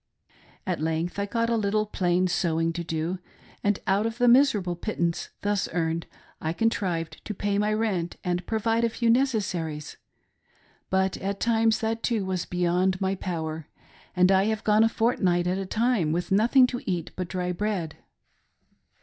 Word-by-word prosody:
At - - -2
length 165 +4 -1
I, 200 - -1
got 230 +2 0
a - - +3
little 215 0 +1
plain 185 -3 +1
sewing 165 -2 0
to 170 - -4
do, 165 +3 -2 0.4
and 205 -1 +2
out 200 +3 +2
of 230 +1 -5
the 245 0 +3
miserable 235 -8 +4
pittance 170 -3 -2
thus 205 -1 0
earned 165 -1 -1 0.3
I 160 +1 -1
contrived 180 -6 -1
to 210 - -5
pay 205 +1 0
my 210 +1 +1
rent 210 -6 -1
and 180 -1 -1
provide 225 +1 +1
a 235 - +3
few 230 0 +1
necessaries; 185 - -1 0.9
but 190 0 +1
at 200 +1 -3
times 225 -1 +2
that 225 0 -1
~too 225 -5 0
was 185 -2 -2
beyond 180 +1 +1
my 190 0 0
power, 160 -4 -4 0.5
and 180 +1 +5
I 190 +1 +4
have 220 0 -1
gone 215 +1 +4
a 225 - +4
fortnight 190 -7 +1
at 180 +2 0
a 195 - -4
time 220 -7 +1
with 175 +3 -2
nothing 235 +6 +5
to 250 -1 -3
eat 175 -3 -2
but 185 -1 -3
dry 180 0 -2
bread. 180 -4 -2
190 Hz, 170 wpm, -26 LUFS, 175-220 Hz, 0.9 s, and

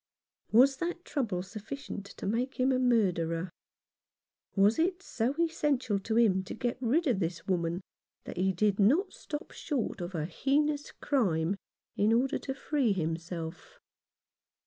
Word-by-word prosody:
Was 265 +4 +6
that 345 +3 -3
trouble 225 - -1
sufficient 215 +3 -7
to - - -6
make 240 +7 -1
him 255 +1 +4
a 255 - +2
murderer? 180 -8 +1 1.0
Was 205 +5 +4
it 360 +3 +1
so 245 -4 -1
essential 290 -10 +1
to 220 +3 -1
him 205 -5 +4
to - - -6
get 245 +1 -2
rid 275 +8 +2
of 245 -9 +2
this 165 -2 -2
woman 175 -1 0 0.4
that - - -8
he 190 +2 +2
did 200 +2 +1
not 280 - +4
stop 295 0 -6
short 260 - -3
of 175 +1 -5
a 155 -2 -1
heinous 290 - 0
crime 190 - +1 0.4
in 210 +2 +3
order 260 +5 +2
to 265 - -4
free 275 -6 +1
himself? 165 - -4
225 Hz, 145 wpm, -30 LUFS, 185-275 Hz, 1.0 s, Was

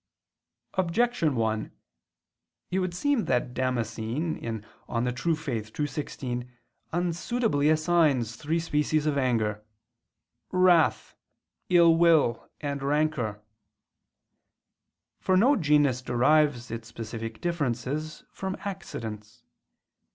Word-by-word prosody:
Objection 185 - +1
1: 110 -2 -1 1.0
It 185 - +1
would 185 -2 -2
seem 285 +2 +1
that 125 -1 0
Damascene 125 +4 -2
(De 110 -2 -5 0.2
Fide 120 +1 -1 0.5
Orth. 105 0 -12
ii, 150 - +2
16) 125 -4 -5 0.4
unsuitably 175 -1 0
assigns 155 -7 +2
three 155 +7 -1
species 155 -1 0
of 150 -2 +1
anger 110 -6 0 0.9
"wrath," 185 -3 +3 0.6
"ill 170 -2 +6
will" 160 -9 +3
and 140 -2 -3
"rancor." 140 -7 0 1.8
For 185 - +2
no 255 +9 +5
genus 145 - +3
derives 125 0 +2
its 115 0 -6
specific 115 0 -6
differences 150 -2 -2
from 190 0 -4
accidents. 115 - -7
145 Hz, 95 wpm, -27 LUFS, 120-170 Hz, 1.8 s, ill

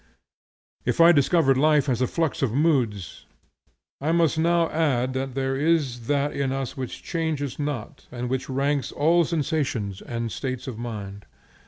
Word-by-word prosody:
If - - -1
I 165 - +8
have - - +1
described 140 -1 +3
life 150 0 +3
as 125 -2 0
a 130 - +2
flux 165 0 -1
of 135 -5 +1
moods, 125 - 0 0.7
I 155 +3 0
must 165 -2 +3
now 170 +1 +2
add 130 -6 +1
that 130 0 -3
there 135 0 -1
is 140 -6 0
that 145 0 +1
in 140 -1 -1
us 135 -1 -3
which 130 -3 -6
changes 155 -5 -2
not 145 -1 -5
and 125 0 -4
which 130 +2 -3
ranks 140 +1 0
all 165 +3 +3
sensations 140 - -2
and 115 -1 -4
states 130 0 -4
of 125 -5 -6
mind. 105 -4 -7
135 Hz, 165 wpm, -25 LUFS, 125-155 Hz, 0.7 s, I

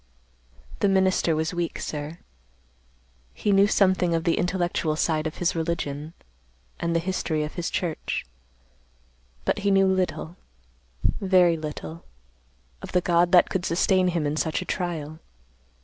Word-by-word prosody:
"The 200 - +3
minister 190 -4 +2
was 160 +2 -1
weak, 175 -1 -2
sir. 150 +2 -5 1.2
He 205 - 0
knew 200 +1 +5
something 185 -4 +3
of 165 - -1
the 165 0 +2
intellectual 175 -3 0
side 155 0 0
of 155 - -7
his 175 -1 0
religion 160 -2 -3 0.6
and 170 0 -1
the - - +4
history 165 -3 -1
of 150 - -5
his 175 -2 -3
church, 170 -4 -3 1.2
but - - +1
he 200 0 0
knew 195 0 +5
little, 180 -3 -1 0.7
very 185 -3 +3
little, 160 +1 -7 0.8
of - - -9
the 180 - +3
God 175 0 +2
that 180 - +6
could 190 - -1
sustain 185 +1 +2
him 170 -4 0
in 145 +1 -1
such 160 0 0
a - - -14
trial. 160 -5 -4
170 Hz, 145 wpm, -25 LUFS, 160-185 Hz, 1.2 s, that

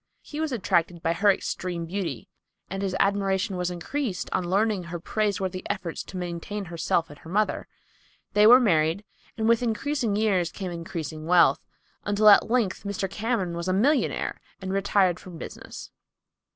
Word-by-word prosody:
He 295 - -7
was 315 -2 -1
attracted 175 -7 0
by 165 - +2
her 200 +4 +4
extreme 180 -3 -3
beauty 165 - -4 0.4
and 195 0 -3
his 190 -2 -1
admiration 195 0 +1
was 180 0 -1
increased 195 +4 -3
on 175 - -1
learning 200 -1 +1
her 170 0 -5
praiseworthy 190 -1 -1
efforts 170 -2 -3
to 185 - -8
maintain 180 +3 -4
herself 170 -2 -1
and 145 - -14
mother. 205 +6 -1 0.7
They 210 +1 +6
were 245 +3 +9
married, 165 -4 +2 0.3
and 220 0 0
with 230 0 +4
increasing 240 -1 -1
years 195 -5 +1
came 190 -3 -5
increasing 165 -2 -6
wealth, 170 -5 +4 0.4
until 205 +1 +4
at 205 - +6
length 230 -6 +1
Mr. 200 -1 -2
Cameron 195 -3 -2
was 170 +1 -4
a 185 - +1
millionaire 265 +9 +1 0.2
and 190 0 -4
retired 195 -2 +2
from 180 -3 -10
business. - - -9
190 Hz, 160 wpm, -26 LUFS, 175-210 Hz, 0.7 s, were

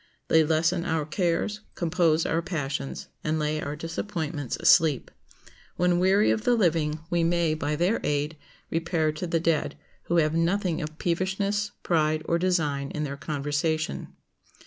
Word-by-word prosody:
They 160 0 +6
lessen 165 +3 +1
our 160 -3 -1
cares, 175 +6 -1 0.2
compose 165 -2 +2
our 165 - +1
passions, 140 -5 -4 0.2
and 155 +1 0
lay 155 0 -1
our 145 +1 -4
disappointments 160 - -4
asleep. 155 -6 +4 0.6
When 175 0 +2
weary 195 +3 +4
of 220 - 0
the 245 -1 +3
living, 160 -7 +1
we 170 -1 +2
may, 170 -1 +2
by 150 -1 -1
their 180 +8 +1
aid, 150 +2 -1 0.4
repair 165 -1 0
to 155 +4 -5
the 165 0 +1
dead, 165 -3 0 0.3
who 170 - 0
have 155 -2 +3
nothing 175 +1 +1
of 155 0 -6
peevishness, 195 +4 -1
pride, 155 -2 +1
or 170 - +1
design 150 -6 0
in 150 - -3
their 140 -1 -3
conversation. 150 +3 -2
165 Hz, 150 wpm, -26 LUFS, 155-175 Hz, 0.6 s, They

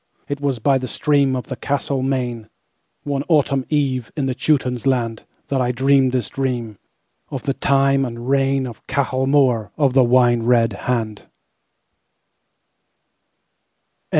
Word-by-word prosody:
It 145 0 -4
was 140 -3 0
by 135 +4 +2
the 130 - -5
streamOf 140 -2 +1
the 130 - -6
castled 140 0 -2
Maine, 120 -4 -2 0.5
One 140 -1 -2
Autumn 140 -4 +2
eve, 135 -5 -1
in 140 - 0
the 130 - -1
Teuton's 130 -2 0
land, 115 -4 -1 0.2
That 135 -2 0
I 125 0 +1
dreamed 135 +1 +3
this 125 -4 -1
dreamOf 120 -6 -3 0.7
the 135 - -1
time 135 0 +2
and 120 -3 -4
reignOf 135 -1 -1
Cahal 130 -1 -1
Mór 130 -7 +2
of 140 -4 +2
the 130 -1 +5
Wine 120 -1 +3
red 115 -2 +2 0.2
Hand. 110 -4 -2
130 Hz, 130 wpm, -20 LUFS, 120-140 Hz, 0.7 s, the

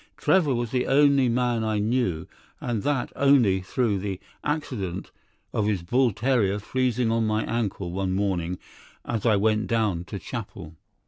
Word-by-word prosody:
Trevor 160 -9 +3
was 120 -1 -2
the 125 -1 0
only 140 -2 +4
man 120 -1 +1
I 110 -1 0
knew, 105 -7 0 0.3
and 115 -4 -2
that 140 -1 -1
only 125 -9 +4
through 105 +1 0
the 95 -1 -4 0.2
accident 110 - -3 0.4
of 105 - 0
his 100 -5 0
bull 125 +7 +2
terrier 110 -3 +1
freezing 125 +1 0
on 115 0 +1
to 110 - +1
my 110 +1 0
ankle 100 -6 -2
one 95 0 -1
morning 90 -3 -1 0.5
as 115 -1 -1
I 110 - +5
went 110 +1 +1
down 105 -7 0
to 100 - -6
chapel. 95 -6 -7
110 Hz, 160 wpm, -25 LUFS, 95-125 Hz, 0.5 s, I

